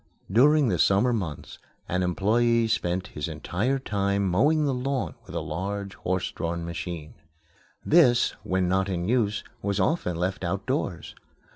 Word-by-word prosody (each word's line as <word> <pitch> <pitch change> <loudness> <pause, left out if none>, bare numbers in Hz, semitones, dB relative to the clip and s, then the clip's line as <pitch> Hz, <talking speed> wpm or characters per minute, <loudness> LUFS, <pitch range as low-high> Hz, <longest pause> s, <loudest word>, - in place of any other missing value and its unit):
During 140 +5 +5
the 90 -5 0
summer 100 +9 +3
months 85 -10 -5 0.3
an 90 +1 0
employé 115 +6 +2
spent 90 -4 -1
his 75 - -3
entire 120 +10 -1
time 100 -5 0
mowing 145 - +3
the 140 - +1
lawn 130 0 -2
with - - -9
a - - -1
large 100 +2 -4
horse 90 0 -2
drawn 85 0 -3
machine. 85 -1 -6 0.7
This, 130 -8 +5
when 95 -1 0
not 95 +2 +1
in 90 -1 -2
use, 110 -3 +1 0.2
was 100 -1 -1
often 160 - 0
left 90 +3 -2
outdoors. 95 - -2
100 Hz, 145 wpm, -26 LUFS, 90-120 Hz, 0.7 s, During